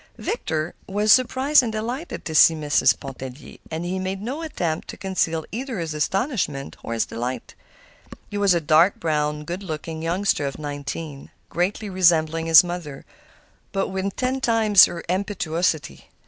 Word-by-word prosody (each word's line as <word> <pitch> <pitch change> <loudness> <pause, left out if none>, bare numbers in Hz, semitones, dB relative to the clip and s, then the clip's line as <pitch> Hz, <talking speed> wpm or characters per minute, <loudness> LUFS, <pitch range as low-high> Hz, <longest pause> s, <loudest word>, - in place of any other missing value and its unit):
Victor 160 - -3 0.2
was 210 +2 +4
surprised 265 +3 +4
and 235 -3 -3
delighted 240 +9 -5
to 160 - -4
see 160 +1 +7
Mrs. 145 -4 +2
Pontellier, 130 0 -9
and 160 +2 -4
he 185 +2 -2
made 190 +1 -3
no 255 +10 -5
attempt 175 - -3
to - - -8
conceal 165 -4 -1
either 250 +1 -4
his 165 -3 -3
astonishment 155 - -2
or 115 - -5
his 115 - +1
delight. 120 +1 -5 0.8
He - - -6
was 200 -3 +4
a - - +2
dark 160 +5 +4
browed, 150 -1 -1
good 175 +5 -5
looking 160 -2 -6
youngster 170 -3 0
of 140 - -6
nineteen, 145 0 -6 0.2
greatly 190 +5 -1
resembling 165 -4 +2
his 165 +1 +9
mother, 175 -6 -6 0.7
but 195 0 -1
with 190 +1 -3
ten 260 +1 -1
times 220 -5 +6
her 170 - -6
impetuosity. 175 -4 -2
175 Hz, 155 wpm, -23 LUFS, 155-205 Hz, 0.8 s, his